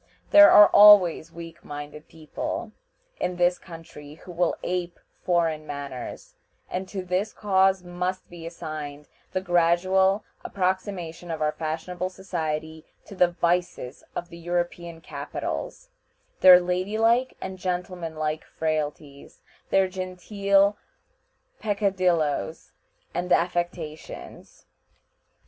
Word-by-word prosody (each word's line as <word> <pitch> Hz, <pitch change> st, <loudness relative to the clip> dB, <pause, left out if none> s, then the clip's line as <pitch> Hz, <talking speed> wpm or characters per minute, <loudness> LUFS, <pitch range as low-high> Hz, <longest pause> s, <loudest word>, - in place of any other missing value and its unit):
There 305 Hz, 0 st, +10 dB
are 210 Hz, -, +9 dB
always 190 Hz, -6 st, +7 dB
weak 170 Hz, 0 st, -11 dB
minded 145 Hz, +1 st, -8 dB
people 160 Hz, -2 st, -6 dB, 0.5 s
in 180 Hz, -, -2 dB
this 175 Hz, 0 st, +2 dB
country 160 Hz, -4 st, -12 dB
who 180 Hz, -, -12 dB
will 175 Hz, 0 st, 0 dB
ape 175 Hz, -1 st, -3 dB, 0.2 s
foreign 165 Hz, -3 st, 0 dB
manners, 140 Hz, -4 st, -7 dB, 0.4 s
and 185 Hz, +1 st, -4 dB
to 190 Hz, -2 st, -5 dB
this 185 Hz, +4 st, -2 dB
cause 190 Hz, -2 st, +2 dB
must 180 Hz, +1 st, -4 dB
be 170 Hz, -1 st, -9 dB
assigned 155 Hz, -3 st, -7 dB, 0.2 s
the 185 Hz, -, -1 dB
gradual 185 Hz, +3 st, +2 dB, 0.2 s
approximation 185 Hz, -3 st, -3 dB
of 160 Hz, -1 st, -3 dB
our 155 Hz, -1 st, +1 dB
fashionable 165 Hz, +4 st, -4 dB
society 160 Hz, -4 st, -4 dB, 0.2 s
to -, -, -11 dB
the 180 Hz, -1 st, +5 dB
vices 175 Hz, -6 st, -2 dB
of 175 Hz, -, -5 dB
the 170 Hz, -, -11 dB
European 175 Hz, -1 st, -3 dB
capitals, -, -, -6 dB, 0.5 s
their 180 Hz, -1 st, +9 dB
ladylike 215 Hz, +8 st, +1 dB
and 190 Hz, 0 st, -7 dB
gentlemanlike 170 Hz, -4 st, -3 dB
frailties, 150 Hz, -2 st, -4 dB, 0.3 s
their 195 Hz, -1 st, +3 dB
genteel 195 Hz, +2 st, +1 dB, 0.8 s
peccadilloes 185 Hz, -7 st, 0 dB, 0.4 s
and 180 Hz, +1 st, -3 dB
affectations. 175 Hz, -3 st, -3 dB
175 Hz, 105 wpm, -25 LUFS, 160-185 Hz, 0.8 s, There